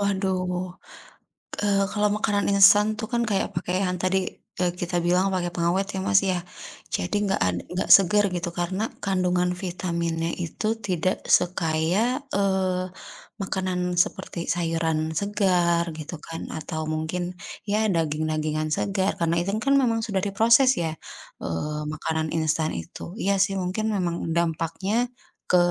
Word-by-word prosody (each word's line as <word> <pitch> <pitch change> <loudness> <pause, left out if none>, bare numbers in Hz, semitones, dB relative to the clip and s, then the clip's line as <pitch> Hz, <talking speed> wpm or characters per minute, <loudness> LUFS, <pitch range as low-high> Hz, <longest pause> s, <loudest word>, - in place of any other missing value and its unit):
Waduh. 185 -2 -1 0.9
Eee, 200 -1 +3
kalau 210 -1 +2
makanan 205 -1 +1
instan 200 +1 +7
tuh 220 - -3
kan 235 0 +2
kayak 205 -4 -1
pake - - -2
yang 180 -1 0
tadi, 185 +2 +1 0.4
eee, 180 -1 +2
kita 175 0 -1
bilang 180 +3 +2
pakai 180 -2 0
pengawet 175 +3 +1
ya - - -1
Mas 195 -1 +5
ya. 185 -3 -1 0.5
Jadi 180 - -1
nggak 195 -1 0
ad 90 -1 +1
nggak 180 +1 -2
seger 200 +2 +4
gitu 175 0 -2
karena 185 +4 -1 0.2
kandungan 180 -2 +1
vitaminnya 170 -2 -2
itu 175 +4 -4 0.2
tidak 185 +1 0
sekaya, 180 - 0 0.2
eee, 190 -2 +1 0.6
makanan 185 -2 -1
seperti 190 -4 -7
sayuran 165 -1 0
segar, 180 -4 +2
gitu 155 +2 -6
kan 165 +1 -7
atau 160 0 -4
mungkin 170 +3 -3 0.3
ya 215 +2 +2
daging-dagingan 155 -1 -1
segar, 195 0 0
karena 170 0 +1
instan 195 +5 -1
kan 275 0 +3
memang 230 -3 +2
sudah 200 -3 0
diproses 230 +6 +5
ya, 160 -1 -2 0.5
eee, 150 - -3
makanan 160 0 -2
instan 160 0 +1
itu. 85 - -7
Iya 200 - +2
sih, 195 -1 -1
mungkin 185 +4 -2
memang 175 -3 0 0.2
dampaknya 170 +4 -1 0.5
ke 180 - +4
180 Hz, 140 wpm, -25 LUFS, 165-195 Hz, 0.9 s, instan